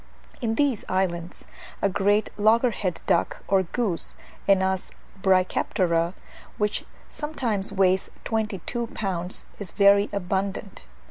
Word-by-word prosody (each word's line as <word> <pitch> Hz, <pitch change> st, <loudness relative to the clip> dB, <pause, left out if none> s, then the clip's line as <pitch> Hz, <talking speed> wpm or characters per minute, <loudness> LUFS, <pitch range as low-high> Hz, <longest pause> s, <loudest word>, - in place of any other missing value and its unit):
In 225 Hz, -1 st, 0 dB
these 275 Hz, -4 st, +1 dB
islands 175 Hz, -2 st, -1 dB, 0.3 s
a -, -, +2 dB
great 205 Hz, +2 st, +2 dB
loggerheaded 215 Hz, -3 st, +2 dB
duck -, -, +1 dB
or 195 Hz, 0 st, +4 dB
goose 190 Hz, -1 st, -2 dB, 0.3 s
(Anas 190 Hz, -1 st, +2 dB, 0.3 s
brachyptera), 185 Hz, -2 st, +2 dB, 0.4 s
which 210 Hz, 0 st, 0 dB, 0.2 s
sometimes 240 Hz, -10 st, -2 dB
weighs 190 Hz, -1 st, +2 dB, 0.2 s
twenty 215 Hz, -5 st, -1 dB
two 235 Hz, -1 st, -2 dB
pounds, 180 Hz, -3 st, -2 dB
is 200 Hz, -3 st, -1 dB
very 200 Hz, 0 st, +5 dB
abundant. 195 Hz, +1 st, -2 dB
195 Hz, 110 wpm, -25 LUFS, 185-215 Hz, 0.4 s, very